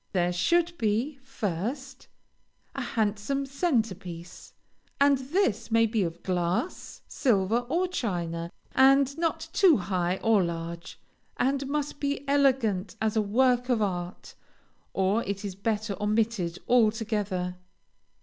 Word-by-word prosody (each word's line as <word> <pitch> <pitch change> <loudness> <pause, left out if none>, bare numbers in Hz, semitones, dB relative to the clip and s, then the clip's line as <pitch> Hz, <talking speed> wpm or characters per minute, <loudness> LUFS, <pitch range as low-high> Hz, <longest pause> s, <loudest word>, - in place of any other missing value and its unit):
There 180 -1 +1
should 340 - +2
be, 230 +7 0
first, 255 - -4 0.7
a - - -4
handsome 220 +5 -1
centre 270 - 0
piece, 175 -2 -10 0.5
and 280 -1 +5
this 260 - 0
may 230 0 +4
be 220 -1 0
of 170 -1 -3
glass, 180 - -2
silver, 230 -1 +1
or 350 +5 +1
china, 170 - -3 0.2
and 275 +1 +5
not 330 -1 -1
too 365 -7 +6
high 180 -1 -1
or 220 -4 +4
large, 170 0 -5 0.4
and 275 +1 0
must 290 0 -2
be 285 -1 -2
elegant 255 -9 +2
as 220 0 0
a 220 - +3
work 245 +4 +2
of 245 -3 +2
art, 180 -2 -4 0.6
or 195 +4 +1
it 200 +1 -4
is 195 - -4
better 210 +1 -2
omitted 210 -5 0
altogether. 215 -6 +1
220 Hz, 125 wpm, -27 LUFS, 185-270 Hz, 0.7 s, too